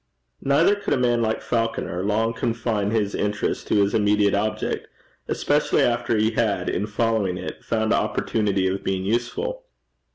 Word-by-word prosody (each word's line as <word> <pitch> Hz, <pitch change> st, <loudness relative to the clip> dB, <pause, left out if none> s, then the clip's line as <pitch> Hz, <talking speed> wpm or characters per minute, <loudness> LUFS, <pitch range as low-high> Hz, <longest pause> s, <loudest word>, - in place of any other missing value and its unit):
Neither 145 Hz, +8 st, +4 dB
could 205 Hz, -, -1 dB
a -, -, -1 dB
man 120 Hz, -2 st, +2 dB
like 110 Hz, -1 st, -1 dB
Falconer 115 Hz, -6 st, -1 dB
long 110 Hz, +3 st, +1 dB
confine 115 Hz, -3 st, -1 dB
his 105 Hz, -2 st, 0 dB
interest 105 Hz, 0 st, -2 dB
to -, -, +1 dB
this 100 Hz, -, -3 dB
immediate 105 Hz, -1 st, +3 dB
object, 105 Hz, +2 st, -1 dB, 0.4 s
especially -, -, +1 dB
after 120 Hz, -1 st, +1 dB
he 110 Hz, +1 st, +2 dB
had, 105 Hz, -5 st, 0 dB
in 100 Hz, +4 st, -1 dB
following 105 Hz, -4 st, 0 dB
it, 90 Hz, -, -7 dB
found 110 Hz, -1 st, 0 dB
opportunity 100 Hz, -4 st, 0 dB
of 95 Hz, +1 st, -2 dB
being 95 Hz, -1 st, -1 dB
useful. 435 Hz, -, -2 dB
110 Hz, 155 wpm, -23 LUFS, 100-115 Hz, 0.4 s, Neither